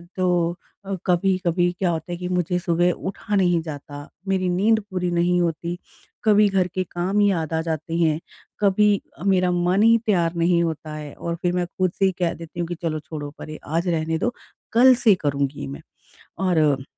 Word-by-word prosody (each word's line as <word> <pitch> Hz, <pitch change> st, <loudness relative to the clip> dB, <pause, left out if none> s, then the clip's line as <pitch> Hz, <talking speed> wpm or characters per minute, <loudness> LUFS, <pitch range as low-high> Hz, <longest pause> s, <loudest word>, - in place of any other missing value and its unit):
तो 175 Hz, -2 st, +1 dB, 0.3 s
अ, 195 Hz, 0 st, -2 dB
कभी-कभी 175 Hz, -1 st, +2 dB
क्या 185 Hz, -2 st, +1 dB
होता 165 Hz, +2 st, -4 dB
है 175 Hz, -, -3 dB
कि 180 Hz, 0 st, -5 dB
मुझे 180 Hz, 0 st, 0 dB
सुबह 175 Hz, +1 st, +2 dB
उठा 205 Hz, +3 st, -4 dB
नहीं 175 Hz, -3 st, +3 dB
जाता, 145 Hz, -2 st, -8 dB, 0.2 s
मेरी 185 Hz, -1 st, +1 dB
नींद 215 Hz, +5 st, +3 dB
पूरी 180 Hz, -1 st, -1 dB
नहीं 175 Hz, +1 st, +2 dB
होती, 170 Hz, +1 st, -2 dB, 0.5 s
कभी 210 Hz, -1 st, +5 dB
घर 190 Hz, -2 st, +1 dB
के 185 Hz, -, +1 dB
काम 185 Hz, +4 st, 0 dB
ही 205 Hz, -1 st, +4 dB
याद 160 Hz, -3 st, -2 dB
आ 160 Hz, -, +1 dB
जाते 160 Hz, 0 st, -3 dB
हैं, 160 Hz, -2 st, +2 dB, 0.4 s
कभी 205 Hz, 0 st, +3 dB, 0.2 s
मेरा 185 Hz, -2 st, +3 dB
मन 180 Hz, +4 st, +2 dB
ही 230 Hz, 0 st, +6 dB
तैयार 175 Hz, -5 st, +2 dB
नहीं 170 Hz, 0 st, +2 dB
होता 160 Hz, -1 st, -4 dB
है 150 Hz, -2 st, -7 dB
और 170 Hz, 0 st, -4 dB
फिर 175 Hz, 0 st, +1 dB
मैं 180 Hz, -1 st, 0 dB
खुद 185 Hz, -2 st, +1 dB
से 195 Hz, -, +4 dB
ही 190 Hz, -, +3 dB
कह 170 Hz, -2 st, +1 dB
देती 165 Hz, +1 st, -10 dB
हूँ 170 Hz, -, -1 dB
कि 175 Hz, -, -4 dB
चलो 155 Hz, -2 st, -1 dB
छोड़ो 145 Hz, -2 st, -7 dB
परे 155 Hz, 0 st, -8 dB
आज 165 Hz, +4 st, -1 dB
रहने 160 Hz, -1 st, 0 dB
दो 240 Hz, +7 st, -1 dB, 0.4 s
कल 255 Hz, +2 st, +7 dB
से 225 Hz, -5 st, +4 dB
करूँगी 140 Hz, -, -1 dB
मैं 70 Hz, +1 st, -7 dB, 0.7 s
और 150 Hz, -6 st, +2 dB
175 Hz, 195 wpm, -23 LUFS, 165-185 Hz, 0.7 s, कल